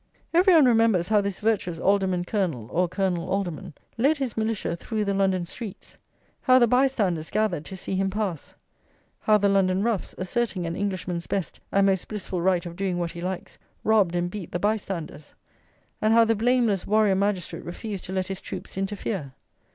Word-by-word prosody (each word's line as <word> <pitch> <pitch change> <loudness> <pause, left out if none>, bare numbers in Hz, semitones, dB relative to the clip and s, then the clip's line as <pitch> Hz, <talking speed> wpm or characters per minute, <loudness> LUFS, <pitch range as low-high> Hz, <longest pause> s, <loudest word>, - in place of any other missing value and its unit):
Every 360 +2 +6
one 310 -4 +7
remembers 225 -7 +3
how 210 -1 +4
this 200 -2 -3
virtuous 205 -6 0
Alderman 190 -1 +1
Colonel, 175 - -1
or 180 +1 +2
Colonel 180 -1 -1
Alderman, 185 -3 -3 0.2
led 285 +6 +3
his 265 -5 -3
militia 220 -5 -1
through 215 +4 -3
the 200 - 0
London 190 -2 +1
streets; 205 +3 -9 0.4
how 255 -1 +5
the 245 - +6
bystanders 225 -10 +1
gathered 205 -8 0
to 190 - -7
see 195 - -5
him 195 +1 +1
pass; 195 -6 -3 0.6
how 215 -1 +4
the 205 -1 +2
London 195 -1 +2
roughs, 230 -4 -1
asserting 190 -1 -1
an 165 0 -3
Englishman's 185 -3 -3
best 190 -5 -3
and 200 0 +4
most 190 -2 +1
blissful 195 -4 -4
right 180 -1 +2
of 170 -1 -7
doing 190 -1 -1
what 170 -1 -2
he 170 - -8
likes, 185 0 -5 0.2
robbed 205 -5 +3
and 175 0 -1
beat 195 -5 -7
the - - -1
bystanders; 195 -7 -3 0.7
and 220 +1 +4
how 230 0 +7
the 225 - +3
blameless 230 -3 +1
warrior 215 -1 +4
magistrate 195 -3 -1
refused 195 +2 -6
to - - -7
let 190 -1 -1
his 190 0 -5
troops - - -7
interfere. 195 -7 -3
195 Hz, 180 wpm, -25 LUFS, 180-215 Hz, 0.7 s, one